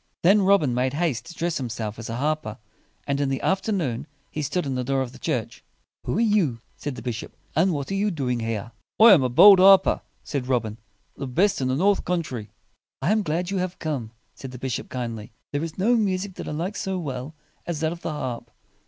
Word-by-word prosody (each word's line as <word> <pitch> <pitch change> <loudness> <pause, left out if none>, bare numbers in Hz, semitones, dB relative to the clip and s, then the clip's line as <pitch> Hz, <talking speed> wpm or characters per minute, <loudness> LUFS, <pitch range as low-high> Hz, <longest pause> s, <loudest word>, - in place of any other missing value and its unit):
Then 200 +4 +6
Robin 190 -9 +3
made 130 +2 0
haste 150 -6 -1
to 170 - -10
dress 170 0 -1
himself 115 -3 -4
as 115 - -7
a 115 - -3
harper; 145 -4 -2 0.5
and 140 0 -1
in 140 - +1
the 135 - -1
after 190 +3 0
noon 140 - -2 0.2
he 155 - -3
stood 175 +4 -1
in 135 - -2
the 125 0 -1
door 135 +1 0
of 125 - -7
the - - -14
church. - - -3 0.4
"Who - - -1
are - - +1
you?" 205 - +2 0.2
said 145 -3 -5
the 115 - -9
bishop, 120 -2 -5 0.2
"and 175 +5 +3
what 145 +1 -3
are - - 0
you 200 +2 +1
doing 130 -9 -1
here?" 115 0 -3 0.3
"I 225 -1 +10
am 155 - +6
a 130 - +1
bold 195 +10 +8
harper," 190 0 +6 0.2
said 135 -4 -3
Robin, 115 -4 -1 0.4
"the 135 - -5
best 180 +7 +2
in 130 - 0
the 130 - +1
north 200 +7 +2
country." 140 -12 -3 0.5
"I 175 - +1
am 215 0 +3
glad 175 +1 -2
you 195 - -1
have 185 0 -2
come," 140 -8 -3 0.2
said 135 - -9
the 125 - -9
bishop 130 -1 -4
kindly. 115 -4 -5 0.2
"There 145 +2 -1
is 165 -1 -6
no 225 +6 +3
music 195 -3 0
that - - -7
I - - -3
like 175 +7 -3
so 190 -1 -2
well 140 -2 -5 0.3
as 170 -3 -2
that 160 0 +1
of 170 0 -7
the - - -3
harp. 130 -5 -5
150 Hz, 230 wpm, -24 LUFS, 125-185 Hz, 0.5 s, I